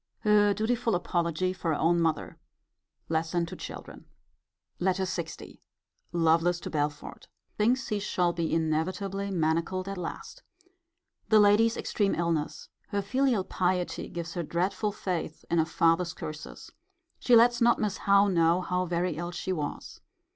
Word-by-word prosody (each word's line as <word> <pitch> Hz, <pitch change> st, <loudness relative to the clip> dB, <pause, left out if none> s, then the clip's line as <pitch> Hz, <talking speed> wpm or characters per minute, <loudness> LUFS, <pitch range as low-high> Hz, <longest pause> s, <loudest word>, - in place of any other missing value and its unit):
Her 210 Hz, -1 st, +4 dB
dutiful 230 Hz, +1 st, 0 dB
apology 175 Hz, +1 st, -1 dB
for 185 Hz, -2 st, -6 dB
her 150 Hz, -, -1 dB
own 170 Hz, +1 st, +3 dB
mother. 160 Hz, -2 st, -1 dB, 0.7 s
Lesson 165 Hz, +1 st, 0 dB
to -, -, -8 dB
children. -, -, -9 dB, 0.7 s
LETTER 190 Hz, +1 st, +1 dB
LX. 175 Hz, -3 st, -5 dB, 0.5 s
Lovelace 170 Hz, +1 st, +2 dB
to -, -, -6 dB
Belford. 150 Hz, -1 st, -3 dB, 0.3 s
Thinks 240 Hz, +4 st, +2 dB
he 210 Hz, -2 st, 0 dB
shall 180 Hz, -3 st, 0 dB
be 170 Hz, -1 st, -2 dB
inevitably 185 Hz, +5 st, -1 dB
manacled 170 Hz, +2 st, 0 dB
at 195 Hz, -1 st, -4 dB
last. 180 Hz, -, -7 dB, 0.9 s
The 220 Hz, -1 st, +6 dB
lady's 210 Hz, +3 st, +4 dB
extreme 200 Hz, -2 st, 0 dB
illness. 165 Hz, -3 st, -2 dB, 0.2 s
Her 205 Hz, -2 st, -2 dB
filial 250 Hz, -1 st, +1 dB
piety 180 Hz, -1 st, -1 dB
gives 170 Hz, -1 st, -6 dB
her 175 Hz, -, -2 dB
dreadful 185 Hz, +6 st, -1 dB
faith 180 Hz, -6 st, -4 dB
in 170 Hz, -, +3 dB
a 160 Hz, -, +2 dB
father's 165 Hz, +1 st, +2 dB
curses. 155 Hz, 0 st, -8 dB, 0.5 s
She 245 Hz, -, +4 dB
lets 240 Hz, +1 st, +5 dB
not 235 Hz, 0 st, +5 dB
Miss 210 Hz, -2 st, -1 dB
Howe 200 Hz, +1 st, +6 dB
know 170 Hz, -1 st, +3 dB
how 180 Hz, 0 st, -1 dB
very 175 Hz, -1 st, -1 dB
ill 175 Hz, +1 st, -3 dB
she 175 Hz, +2 st, -3 dB
was. 150 Hz, -4 st, -5 dB
180 Hz, 145 wpm, -28 LUFS, 165-200 Hz, 0.9 s, The